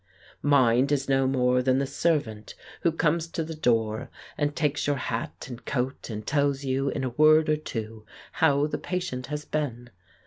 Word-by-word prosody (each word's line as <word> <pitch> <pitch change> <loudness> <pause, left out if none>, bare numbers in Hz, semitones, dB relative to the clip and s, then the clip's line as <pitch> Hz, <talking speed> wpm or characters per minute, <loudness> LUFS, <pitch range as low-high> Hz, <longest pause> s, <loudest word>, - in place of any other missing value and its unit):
"Mind 135 -2 +4
is 140 -1 0
no 135 -1 +2
more 125 -1 +2
than 130 0 +2
the 140 - +1
servant 130 -9 -1 0.3
who 170 - +3
comes 165 0 +1
to 165 0 -3
the 160 +1 -6
door, 115 -4 0 0.3
and 145 -1 -1
takes 150 -3 0
your 145 - +2
hat 120 -3 -4
and 125 -2 -9
coat, 130 0 -3
and 105 -1 -5
tells 140 -1 +1
you 135 +1 0
in - - -3
a 130 - 0
word 155 +5 +5
or 155 - +4
two 110 -7 -6 0.3
how 140 +1 +3
the 150 - -3
patient 180 -9 -4
has 150 +1 -5
been. 120 -6 -3
135 Hz, 180 wpm, -26 LUFS, 125-150 Hz, 0.3 s, word